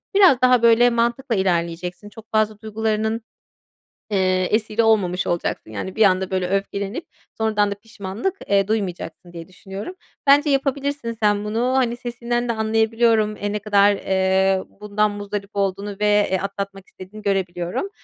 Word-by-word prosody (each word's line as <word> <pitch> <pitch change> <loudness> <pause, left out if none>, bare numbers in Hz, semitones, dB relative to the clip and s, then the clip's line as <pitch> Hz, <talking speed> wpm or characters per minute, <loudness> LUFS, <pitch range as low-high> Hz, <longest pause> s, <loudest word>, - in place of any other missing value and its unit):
biraz 375 -11 +6
daha 250 -2 +5
böyle 235 +1 +6
mantıkla 235 +1 0
ilerleyeceksin. 175 +1 -2
Çok 220 +1 -14
fazla 215 -1 +1
duygularının, 220 +1 -1 0.9
eee, 185 -1 +2
esiri 220 +1 +1
olmamış 190 -5 +2
olacaksın. 170 -9 -2
Yani, 145 - -5
bir 220 - +4
anda 190 -1 +2
böyle 185 -1 0
öfkelenip 200 - -2 0.3
sonradan 210 -2 +1
da - - -2
pişmanlık, 210 - -5
eee, 195 -1 +3
duymayacaksın 180 -5 -4
diye 165 -1 -8
düşünüyorum. 195 - -8 0.3
Bence 290 +2 +6
yapabilirsin 275 -2 -1
sen 205 0 +2
bunu. 235 +4 0
Hani, 240 -2 +1
sesinden 240 0 -3
de - - +2
anlayabiliyorum. 220 0 +2
Eee, 205 0 -3
ne 210 - -1
kadar, 205 0 +4
eee, 190 0 +1 0.2
bundan 210 0 +1
muzdarip 205 0 -5
olduğunu 200 0 -1
ve, 210 0 +3
eee, 190 - +2
atlatmak 195 0 -5
istediğini 195 +3 -12
görebiliyorum. 185 - -2
210 Hz, 145 wpm, -21 LUFS, 190-230 Hz, 0.9 s, biraz